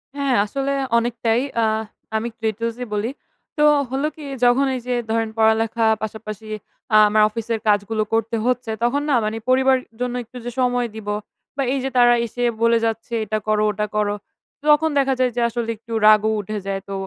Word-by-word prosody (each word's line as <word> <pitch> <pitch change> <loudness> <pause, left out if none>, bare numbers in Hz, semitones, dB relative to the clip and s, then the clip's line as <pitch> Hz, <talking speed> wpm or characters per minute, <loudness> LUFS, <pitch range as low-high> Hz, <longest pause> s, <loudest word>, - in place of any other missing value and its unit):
হ্যাঁ, 280 -3 +1
আসলে 275 +5 -2 0.3
অনেকটাই। 235 0 +1 0.2
আ - - +2 0.5
আমি 230 +2 -2
ক্রেটোজে 230 +2 -2
বলি। 210 +3 -1 0.5
তো 300 - +3 0.3
হলো 275 +3 -1
কি? 310 - -11 0.2
যখন 245 +3 +4
এই 255 - -3
যে 250 - 0 0.2
ধরেন 225 -1 0
পড়ালেখা 225 +1 +2 0.2
পাশাপাশি 215 0 -6 0.5
আ - - +9
আমার 215 0 +3
অফিসের 225 0 -3
কাজগুলো 210 +1 +2
করতে 225 +1 0
হচ্ছে, 250 -2 0
তখন 275 +4 +2
না 270 - +4
মানে 215 +1 -2
পরিবারের 260 0 +3 0.2
জন্য 250 0 -1
একটু 250 +2 -13
যে 245 - -3
সময় 245 -1 +1
দিব, 215 -2 -9 0.5
বা 275 - +1
এই 275 - 0
যে 270 - -1
তারা 240 0 +6
এসে 245 +2 -4 0.2
বলে 230 0 +5
যাচ্ছে, 225 +1 -3
"এটা 215 +1 -1
করো, 215 0 +2
ওটা 210 +1 -2
করো।" 205 -1 +1 0.6
তখন 320 +2 +4
দেখা 270 -1 +2
যায় 250 -1 +2
যে, 240 - 0
আসলে 230 0 -3
একটু 230 +1 -10
রাগও 215 0 +6
উঠে 210 +1 -4
যায়। 195 0 -2
তো - - -4
230 Hz, 185 wpm, -21 LUFS, 215-250 Hz, 0.6 s, আ